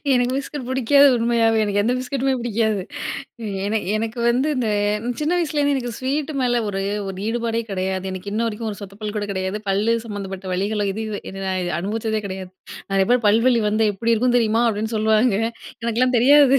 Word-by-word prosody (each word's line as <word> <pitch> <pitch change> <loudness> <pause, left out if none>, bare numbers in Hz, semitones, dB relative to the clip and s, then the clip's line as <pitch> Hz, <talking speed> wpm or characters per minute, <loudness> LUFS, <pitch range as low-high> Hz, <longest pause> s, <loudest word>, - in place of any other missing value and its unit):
எனக்கு 250 0 +2
பிஸ்கட் 280 -2 -6
பிடிக்காது 265 +2 +5
உண்மையாவே, 230 -1 +2
எனக்கு 205 0 +1
எந்த 240 +4 +1
பிஸ்கட்டுமே 265 +1 -1
பிடிக்காது. 220 -4 0 0.8
ஏன்னா 215 +2 +1 0.2
எனக்கு 225 +2 -3
வந்து 255 +5 +2
இந்த 240 -3 0 0.5
சின்ன 300 +1 0
வயசுலேருந்து 295 -3 +1
எனக்கு 245 -3 -3
ஸ்வீட்டு 285 +3 -2
மேல 245 -1 +2
ஒரு 195 -1 -2 0.3
ஒரு 190 - -5
ஈடுபாடே 230 0 -1
கிடையாது. 190 0 -2
எனக்கு 185 +2 -6
இன்ன 225 +2 0
வரைக்கும் 225 0 -3
ஒரு 205 - -8
சொத்த 195 0 -9
பல் 210 -1 -4
கூட 205 -1 -1
கிடையாது. 190 +2 -2
பல்லு 205 +4 +2
சம்மந்தப்பட்ட 195 -3 -5
வலிகளும் 205 +2 0
இது 220 - -4
இது 210 -1 -4
என்ன 195 0 -6
நான் 185 -2 -1
அனுபவிச்சதே 220 +3 -2
கிடையாது. 190 -1 -6 0.4
அதுக்கு 195 0 +2
அப்புறம் 240 -2 +3
"பல்வலி 230 +3 +4
வந்தா 215 +1 +2
எப்டி 230 +4 +1
இருக்கும் 245 +2 +2
தெரியுமா" 225 0 +2
அப்டின்னு 220 +1 -2
சொல்லுவாங்க. 220 +1 +3 0.5
எனக்கெல்லாம் 240 +2 +2
தெரியாது. 275 +2 +6
225 Hz, 175 wpm, -22 LUFS, 205-245 Hz, 0.8 s, தெரியாது